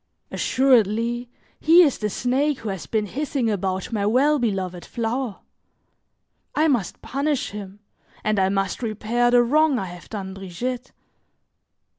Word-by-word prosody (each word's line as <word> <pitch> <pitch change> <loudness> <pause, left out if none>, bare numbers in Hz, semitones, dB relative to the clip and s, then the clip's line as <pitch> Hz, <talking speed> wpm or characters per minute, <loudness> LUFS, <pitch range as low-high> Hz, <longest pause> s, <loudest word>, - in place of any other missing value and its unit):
Assuredly, 240 -1 +2 0.3
he 335 +3 +7
is 290 -6 +1
the 210 - -1
snake 265 +6 0
who 220 - -4
has 190 -3 -5
been 215 -2 0
hissing 265 0 -1
about 190 +1 -2
my 205 -2 0
well 270 +8 +3
beloved 190 -6 -2
flower. 235 -1 -3 1.1
I 310 +1 +3
must 240 - -1
punish 280 +1 -1
him, 205 0 -8 0.4
and 215 -1 +1
I 190 0 +3
must 195 +2 -1
repair 230 +2 0
the 245 0 +5
wrong 300 +3 +3
I 195 - -2
have 175 -1 -10
done 195 -3 -5
Brigitte. 235 +7 -5
230 Hz, 140 wpm, -23 LUFS, 195-260 Hz, 1.1 s, he